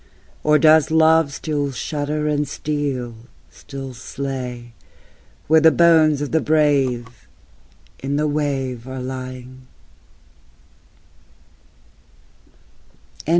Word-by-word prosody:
Or 150 0 +4
does 155 0 +5
love 160 -1 +4
still 145 -1 -3
shudder 150 +3 -3
and 150 -1 0
steel 140 -5 -3 0.4
still 135 -2 -9
slay, 125 -1 -6 0.7
Where 160 +1 +4
the 160 - +7
bones 160 -3 +4
of 145 - -5
the 160 - +2
brave 135 -6 0 0.7
in 140 +1 -3
the 150 +1 +1
wave 135 -5 -2
are 130 0 -6
lying? 130 0 -8
145 Hz, 90 wpm, -20 LUFS, 130-150 Hz, 0.7 s, the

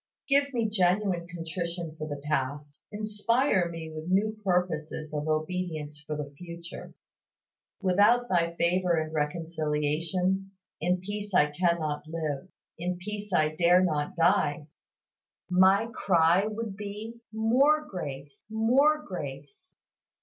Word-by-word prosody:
Give 280 0 +3
me 235 -4 0
genuine 185 -3 +1
contrition 170 -1 -5
for 155 -1 -5
the 145 -2 -5
past, 145 0 -2
inspire 215 -1 +1
me 165 -1 -7
with 155 +2 -6
new 210 +4 +2
purposes 165 -5 -1
of 150 +1 -2
obedience 155 -2 -2
for 150 0 -5
the 145 -1 -5
future. 170 0 -9 0.9
Without 205 +6 +4
Thy 170 -3 +1
favor 180 +1 +2
and 155 -1 -2
reconciliation, 165 +4 -1 0.3
in 180 +2 +1
peace 205 0 -4
I 150 0 +5
cannot 160 -2 0
live, 155 -1 -3 0.3
in 180 +1 -2
peace 210 +2 -6
I 155 -3 +2
dare 175 +3 +5
not 150 -4 -1
die! 165 -3 +2 0.9
My 190 +4 +5
cry 175 +2 +3
would 220 -1 -4
be, 210 +3 -7
"More 265 +8 +3
grace, 140 - -7
more 265 +8 +3
grace!" 185 - -8
180 Hz, 120 wpm, -28 LUFS, 155-205 Hz, 0.9 s, I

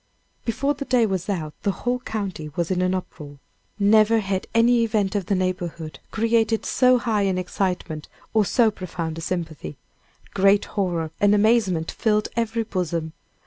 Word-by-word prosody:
Before 275 +5 0
the 280 - -5
day 250 -4 +3
was 190 -2 -2
out 160 -6 -2
the 205 - 0 0.2
whole 245 +1 +1
county 195 -10 -4
was 170 +1 -1
in 180 -1 +1
an 185 0 +1
uproar. 150 -5 -7 0.4
Never 215 +2 +5
had 195 -3 -2
any 230 +1 +4
event 215 -4 0
of 200 -4 -2
the 200 - +1
neighborhood 175 -3 -3
created 225 0 +1
so 255 -1 +4
high 225 -4 0
an 190 -2 +1
excitement 180 -4 -3 0.3
or 220 -1 +4
so 225 +2 +3
profound 165 -4 -5
a - - -6
sympathy. 160 - -4 0.6
Great 200 +1 +4
horror 175 -6 -1
and 205 0 +4
amazement 205 -6 +2
filled 210 -2 0
every 230 0 0
bosom. 170 -6 -3
200 Hz, 160 wpm, -23 LUFS, 175-225 Hz, 0.6 s, Never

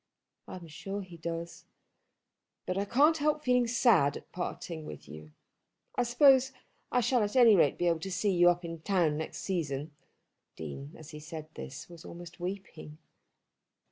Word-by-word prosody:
"I - - -7
am 180 -2 -9
sure 195 +6 -6
he 180 -2 -12
does." 170 +1 -6 1.0
"But 185 - -2
I 200 +1 0
can't 295 +9 +4
help 300 +1 +1
feeling 250 -1 +3
sad 230 - +4
at - - -15
parting 170 -2 -5
with 75 - -9
you. 75 0 -11 0.7
I - - +1
suppose 265 +2 +5 0.4
I 250 - +3
shall 245 +1 +2
at 205 +2 -1
any 235 -4 +7
rate 150 -6 +3
be 175 - -1
able 170 -2 +2
to 190 +4 -5
see 190 +3 +1
you 175 0 +6
up 175 0 0
in 165 -1 -6
town 170 -5 +2
next 160 +1 -5
season." 155 -5 -2 0.6
The - - -8
Dean 135 - -7
as 155 - -11
he 150 - -8
said 155 0 -8
this 135 - -8
was 170 -2 -13
almost 175 0 -10
weeping. 175 -4 -6
175 Hz, 175 wpm, -30 LUFS, 160-225 Hz, 1.0 s, any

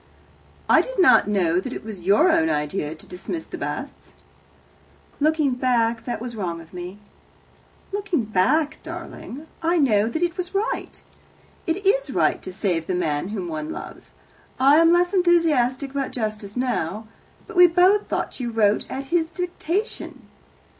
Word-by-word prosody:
"I - - +6
did - - -8
not 365 - +6
know 180 -4 +2
that 255 +7 -5
it - - -7
was 210 -5 -7
your 205 - +4
own 160 - +3
idea 150 +1 -2
to - - -15
dismiss 255 - -6
the - - -8
Basts." - - -6 1.1
"Looking 305 -1 +2
back, 235 -2 +1
that 245 - -3
was 235 0 -6
wrong 175 -5 -3
of 165 +1 -15
me." 180 +2 -7 0.9
"Looking 395 - -1
back, 220 - +1
darling, 330 -4 -8 0.2
I 335 +2 +2
know 225 -8 +3
that 320 +8 -2
it 345 0 -1
was 360 +1 -5
right. 415 +4 -2 0.7
It 365 +5 -2
is - - +2
right - - +1
to 185 - -7
save 180 -4 -1
the 185 - -1
man 160 -2 -1
whom 195 -3 -4
one 155 -2 -4
loves. - - -9 0.5
I 275 +3 +6
am 330 +1 +6
less 355 +2 +3
enthusiastic 305 -8 +2
about 275 -1 -2
justice 215 -2 -4
now. 220 -4 -2 0.4
But - - -11
we 355 0 +8
both 365 +4 +3
thought - - -3
you 245 -2 -2
wrote 215 -2 +1
at 270 - -4
his 330 -2 +2
dictation. 360 +3 -4
250 Hz, 160 wpm, -23 LUFS, -, 1.1 s, we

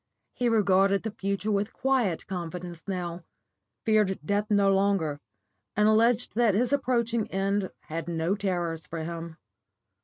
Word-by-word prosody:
He 245 -1 0
regarded 195 -2 +3
the 220 - -3
future 200 +1 -2
with 205 +1 0
quiet 250 -10 0
confidence 175 -1 -6
now, 175 -2 -4 0.6
feared 210 -3 +3
death 205 +3 0
no 200 -2 +4
longer, 190 -7 +1 0.6
and 210 +1 +4
alleged 230 +2 +3
that 225 -3 +3
his 245 +5 +1
approaching 235 -5 +1
end 195 0 0
had 165 +1 -5
no 165 +2 0
terrors 175 -5 -2
for 165 -1 -5
him. 165 0 -6
195 Hz, 140 wpm, -27 LUFS, 175-215 Hz, 0.6 s, no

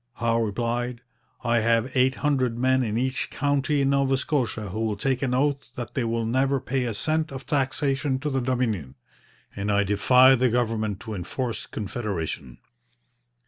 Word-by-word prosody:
Howe 115 0 +1
replied: 120 +3 -2 0.4
'I 120 -1 +2
have 115 +3 +1
eight 130 +1 +3
hundred 130 -5 0
men 130 +1 +3
in 110 -3 -1
each 130 +2 -1
county 145 +1 0
in 135 0 +2
Nova 135 -1 +2
Scotia 120 -7 -1
who 105 +4 -4
will 110 -2 0
take 130 +5 -1
an 130 -2 0
oath 135 -2 -1
that 120 -4 -6
they 130 - 0
will 115 0 -1
never 135 +4 +1
pay 130 0 -1
a 115 - -2
cent 155 +6 0
of 135 -1 -7
taxation 135 0 0
to 145 +3 -3
the 135 -1 0
Dominion, 115 - -1 0.6
and 100 +1 -2
I 100 0 +3
defy 125 +6 +5
the 130 -1 +3
government 110 -4 -1
to 110 - -6
enforce 110 +6 -4
Confederation.' 90 - -4
125 Hz, 170 wpm, -25 LUFS, 110-135 Hz, 0.6 s, defy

